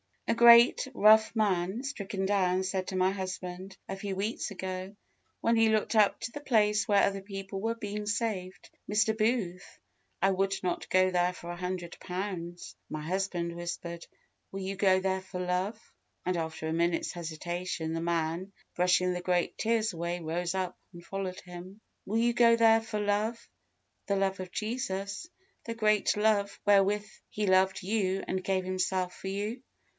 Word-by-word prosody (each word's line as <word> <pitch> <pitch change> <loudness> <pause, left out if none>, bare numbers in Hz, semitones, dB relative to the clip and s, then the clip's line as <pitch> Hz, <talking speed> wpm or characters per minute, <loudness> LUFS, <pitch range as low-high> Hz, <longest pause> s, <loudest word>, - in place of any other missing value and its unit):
A - - +3
great, 235 +3 +7
rough 220 +1 +6
man 200 +1 0
(stricken 200 -8 -3
down), 190 -2 +2
said 185 0 -2
to 190 - -4
my 185 0 +3
husband, 185 0 -6
a 195 - -4
few 195 0 -4
weeks 210 +5 -2
ago, 185 0 -5 0.5
when 230 0 +3
he 225 0 +5
looked 220 0 +1
up 215 -2 +4
to 235 - -4
the 290 - -6
place 210 -7 +2
where 200 -1 +4
other 195 0 +1
people 195 0 -6
were 225 +2 -1
being 210 -1 -5
saved, 210 -4 -3 0.2
"Mr. 220 +1 +2
Booth, 215 -5 -1 0.4
I 195 - +4
would 195 +1 +1
not 180 -1 -2
go 185 0 +4
there 180 0 +2
for 175 -1 -8
a 175 - -6
hundred 180 -1 -4
pounds!" 180 -2 -5
My 155 - -4
husband 175 -1 -2
whispered, 170 0 -6 0.4
"Will 195 - -5
you 190 +1 -4
go 190 -1 +4
there 190 0 0
for 185 -1 -7
love?" 180 +4 -1 0.5
and, 180 0 0
after 160 -1 -4
a 160 - -1
minute's 170 0 0
hesitation, 170 0 -4
the 165 - -2
man, 170 +3 -1 0.2
brushing 180 0 +3
the 180 - -3
great 180 -1 0
tears 225 -1 +1
away, 170 0 -3
rose 170 +3 -2
up, 185 -1 -3
and 170 0 -12
followed 190 -1 -4
him. 180 +3 -11 0.2
Will 220 +3 0
you 240 +1 +3
go 235 -1 +6
there 225 -1 +5
for 225 -1 -4
love 215 +3 -1 0.6
the 200 - +1
love 195 0 0
of 185 -1 -5
Jesus! 215 - -3 0.4
the 230 - -4
great 215 -2 +2
love 210 -2 +1
wherewith 205 +1 +4 0.2
He 210 - -2
loved 190 0 +3
you 195 -1 0
and 185 - -1
gave 190 0 0
Himself 185 0 -1
for - - -8
you? 205 +5 -3
190 Hz, 170 wpm, -30 LUFS, 180-210 Hz, 0.6 s, great